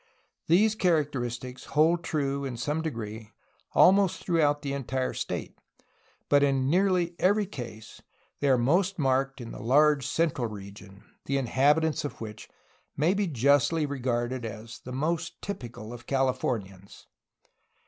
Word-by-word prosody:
These 205 +6 +4
characteristics 135 - -1
hold 165 +3 +2
true 140 -3 -1
in 130 -3 -4
some 150 +6 -1
degree 110 -7 -6 0.4
almost 195 -1 +5
throughout 150 -4 +2
the 140 -1 -2
entire 130 -1 -2
state, - - -4 0.7
but 145 0 +4
in 135 -1 +2
nearly 180 -2 +2
every 205 +3 +3
case 115 - -9 0.4
they 140 - +1
are 130 - +5
most 175 +11 +2
marked 135 -1 +1
in 120 -2 -7
the - - -8
large 140 +4 +3
central 155 -7 0
region, 100 -1 -11 0.2
the 140 - 0
inhabitants 145 +5 +2
of 145 - -6
which 110 -1 -8 0.5
may 160 +6 +3
be 200 -1 0
justly 145 +3 +2
regarded 125 -2 -2
as 110 0 -7
the 125 - -9
most 155 +6 -2
typical 120 - -7
of 120 -1 -11
Californians. 120 -8 -2
135 Hz, 135 wpm, -28 LUFS, 120-160 Hz, 0.7 s, almost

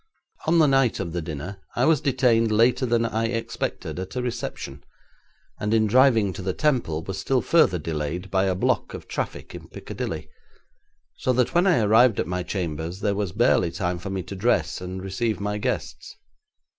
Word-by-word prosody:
On 165 +2 +4
the 160 - +6
night 135 -4 +3
of 85 - -4
the 90 - -2
dinner 80 +5 -6
I - - +2
was 155 -3 +3
detained 120 -4 +2
later 120 +4 +3
than 115 0 +2
I 115 0 -1
expected 115 -5 -3
at 95 +5 -6
a 125 - -1
reception, 75 - -5 0.8
and 105 +2 0
in 110 -1 +3
driving 115 -3 +4
to - - -7
the 95 0 -2
Temple 120 - 0
was 95 +2 -5
still 125 +6 0
further 165 - +4
delayed 80 +4 -4
by 95 0 +2
a 95 -1 +1
block 90 - 0
of - - -10
traffic - - -5
in - - -9
Piccadilly, - - -6 0.9
so 130 - 0
that 125 +3 +1
when 175 +2 +3
I 175 -11 +4
arrived 110 +2 +5
at - - +1
my 90 0 -2
chambers 85 -1 -4
there 100 - +1
was 100 -3 -2
barely 85 +1 +3
time 90 0 -2
for 95 - -6
me 95 -1 -3
to 100 - -8
dress 110 +1 0
and 95 +1 -6
receive 105 +1 -2
my 105 +1 -2
guests. - - -4
105 Hz, 190 wpm, -24 LUFS, 90-120 Hz, 0.9 s, the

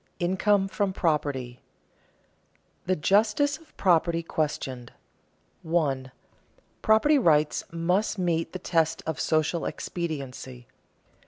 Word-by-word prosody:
INCOME 195 +2 +2
FROM 195 -1 -1
PROPERTY 145 -8 -1
[Sidenote: - - -39
The 185 - +2
justice 215 - +2
of 325 - -23
property 170 -2 +2
questioned] 135 -6 -3 0.7
1. 140 -6 -1 0.7
_Property 255 +6 +4
rights 150 -2 +3
must 180 +6 0
meet 165 -3 0
the - - -5
test 165 -3 0
of 160 -3 -3
social 155 +2 +1
expediency. 135 -7 -5
165 Hz, 100 wpm, -26 LUFS, 150-190 Hz, 0.7 s, Property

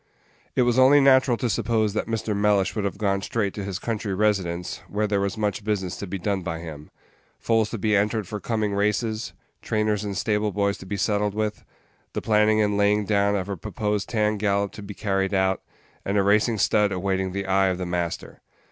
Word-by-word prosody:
It 125 - +4
was 120 +1 +2
only 135 +3 +7
natural 130 -2 +5
to 125 - -1
suppose 110 -2 0
that 105 - -2
Mr. 110 -2 -2
Mellish 100 -1 +2
would 105 -2 -1
have 100 - -3
gone 100 -2 0
straight 100 -1 -1
to 100 - -5
his 95 -2 -4
country 105 -2 -3
residence, 95 -4 -1
where 105 +1 -1
there 100 -1 0
was 100 +2 -2
much 105 -1 -1
business 100 -4 -2
to 100 - -6
be 100 +2 -4
done 95 +1 -1
by 80 -2 -4
him: 80 -3 -9 0.5
foals 115 -2 +1
to 115 - -4
be 105 +1 +1
entered 105 0 +1
for 105 - -5
coming 110 -2 -1
races, 105 +2 -1 0.3
trainers 105 -1 0
and 100 -2 -4
stable 105 +1 0
boys 100 0 0
to 95 - -11
be 100 - -3
settled 105 +1 0
with, 105 -1 -2 0.5
the - - -1
planning 110 0 +3
and 105 -1 +1
laying 105 0 +2
down 100 0 +2
of 95 -2 -2
a 100 - -3
proposed 105 +4 -3
tan 105 -2 +1
gallop 100 -1 0
to - - -10
be 100 0 -8
carried 95 -2 0
out, 95 0 +1 0.4
and 100 +1 -1
a 100 - +4
racing 110 +3 +3
stud 105 0 +2
awaiting 95 0 -1
the 100 +1 -3
eye 95 0 +3
of 90 -1 0
the 90 - -3
master. 85 -1 -4
105 Hz, 210 wpm, -24 LUFS, 95-110 Hz, 0.5 s, only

